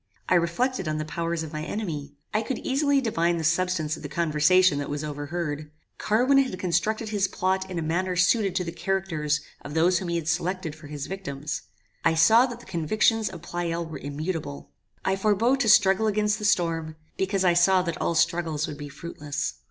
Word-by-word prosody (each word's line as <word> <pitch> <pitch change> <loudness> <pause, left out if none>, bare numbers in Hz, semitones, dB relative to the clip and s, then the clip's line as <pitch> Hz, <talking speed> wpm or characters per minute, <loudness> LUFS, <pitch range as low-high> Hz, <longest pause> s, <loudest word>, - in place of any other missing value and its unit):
I - - +2
reflected 180 +5 +1
on 155 0 -1
the 155 - -3
powers 165 +1 -2
of 160 0 -8
my 155 0 -3
enemy. 155 -7 -4 0.2
I 215 - +2
could 255 +3 -3
easily 280 +1 +1
divine 170 -8 +1
the 165 - -3
substance 165 -1 +1
of - - -11
the - - -6
conversation 165 0 +3
that 145 - -4
was 145 +1 -3
overheard. 150 0 -4 0.3
Carwin 250 +6 +3
had 260 -9 0
constructed 210 +5 0
his 205 -2 +1
plot 190 +1 -1
in 180 - -4
a 165 - -1
manner 180 +3 -1
suited 195 +2 +2
to 180 - +1
the 165 - -4
characters 170 -4 -1 0.2
of 145 +2 -7
those 170 +2 +3
whom 185 - -5
he 170 - -1
had 165 -2 -2
selected 175 0 -1
for 155 -1 -12
his 145 -1 -5
victims. 155 -5 -5 0.4
I 165 - +3
saw 220 +10 +6
that 240 -2 -7
the - - -15
convictions 210 +5 +1
of 170 -3 -10
Pleyel 170 -1 -3
were 160 -1 -7
immutable. 145 - -5 0.3
I 190 - +2
forbore 215 +5 +2
to 235 -5 +2
struggle 205 0 +5
against 210 0 +1
the 210 - -4
storm, 165 -5 +1 0.2
because 190 0 0
I 175 - +5
saw 180 +2 +4
that 170 -2 -4
all 170 - 0
struggles 165 -2 +1
would 145 - -7
be 145 -1 -6
fruitless. 145 -1 -4
170 Hz, 200 wpm, -26 LUFS, 155-195 Hz, 0.4 s, saw